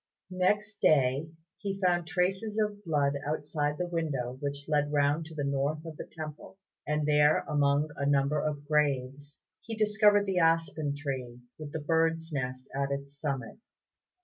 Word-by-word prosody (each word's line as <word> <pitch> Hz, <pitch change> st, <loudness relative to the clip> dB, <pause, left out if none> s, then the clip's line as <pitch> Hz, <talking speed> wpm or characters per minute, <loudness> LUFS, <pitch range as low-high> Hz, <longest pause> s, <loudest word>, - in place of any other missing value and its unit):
Next 205 Hz, +3 st, +1 dB
day 140 Hz, +1 st, +3 dB, 0.3 s
he 195 Hz, -1 st, -3 dB
found 175 Hz, -3 st, +2 dB
traces 190 Hz, +6 st, 0 dB
of 210 Hz, -1 st, -1 dB
blood 145 Hz, -3 st, +2 dB
outside 150 Hz, 0 st, -1 dB
the 180 Hz, -, -1 dB
window 150 Hz, -8 st, -2 dB
which 140 Hz, 0 st, -4 dB
led 145 Hz, -1 st, +1 dB
round 145 Hz, +2 st, +2 dB
to 160 Hz, 0 st, -11 dB
the 145 Hz, -, -2 dB
north 140 Hz, +3 st, -1 dB
of 160 Hz, -1 st, -7 dB
the -, -, -8 dB
temple; 155 Hz, +3 st, -8 dB, 0.3 s
and 150 Hz, 0 st, 0 dB
there 150 Hz, 0 st, +5 dB
among 145 Hz, 0 st, +1 dB
a 140 Hz, -, -1 dB
number 145 Hz, +1 st, +2 dB
of 145 Hz, -1 st, -3 dB
graves 145 Hz, -1 st, 0 dB, 0.2 s
he 225 Hz, -, -6 dB
discovered 210 Hz, -1 st, +4 dB
the 190 Hz, -2 st, +1 dB
aspen 165 Hz, -3 st, +2 dB
tree 130 Hz, -4 st, -5 dB, 0.2 s
with 150 Hz, -2 st, -7 dB
the -, -, -3 dB
bird's 165 Hz, +1 st, +1 dB
nest 130 Hz, -2 st, -3 dB
at 140 Hz, 0 st, -1 dB
its 140 Hz, 0 st, -5 dB
summit. 140 Hz, -, -3 dB
150 Hz, 160 wpm, -30 LUFS, 140-165 Hz, 0.3 s, there